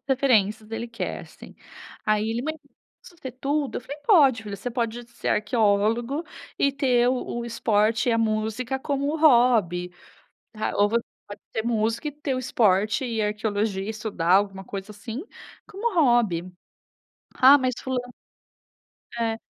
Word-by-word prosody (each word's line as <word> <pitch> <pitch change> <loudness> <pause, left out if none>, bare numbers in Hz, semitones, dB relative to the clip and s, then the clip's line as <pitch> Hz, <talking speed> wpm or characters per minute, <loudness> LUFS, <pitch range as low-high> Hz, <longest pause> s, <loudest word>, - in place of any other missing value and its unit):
referências 220 -5 +2
ele 230 +1 -4
quer, 230 - -5
sim. - - -14 0.5
Aí 215 +1 +1
ele: 235 +2 -2
"Mãe, 315 +2 -2
eu 285 -3 -21 0.3
posso 345 - -16
ser 260 - -6
tudo?". 280 +2 -2
Eu - - -3
falei: 270 +4 -8
"Pode 275 - +5
filho, 205 -2 -6
você 245 +6 -5
pode 235 0 -3
ser - - -6
arqueólogo 225 +6 +1 0.3
e 280 -1 +2
ter 250 -4 +2
o 250 -1 -2
o - - -5
esporte 220 0 +1
e - - +3
a 230 - +2
música 220 +4 -1
como 280 +2 -1
hobby, 235 - +3 0.6
tá. 215 0 -3
Ou 205 0 +3
você 230 +1 0 0.2
pode 205 0 -10
ser 220 - -1
músico 230 +4 -1
e - - -3
ter 290 -2 -3
o - - -2
esporte 215 -1 +1
e 230 -3 -2
a 210 - +1
arqueologia 210 -2 -2
e 205 - -5
estudar 215 -6 -2
alguma 195 0 +2
coisa 195 +2 -7
assim, 225 - -7 0.4
como 430 +2 -3
hobby". 225 - +2 0.8
"Ah, 270 +3 +8
mas 255 -2 0
fulano" 250 -2 -3 1.1
É. 225 -1 0
230 Hz, 165 wpm, -25 LUFS, 210-260 Hz, 1.1 s, Ah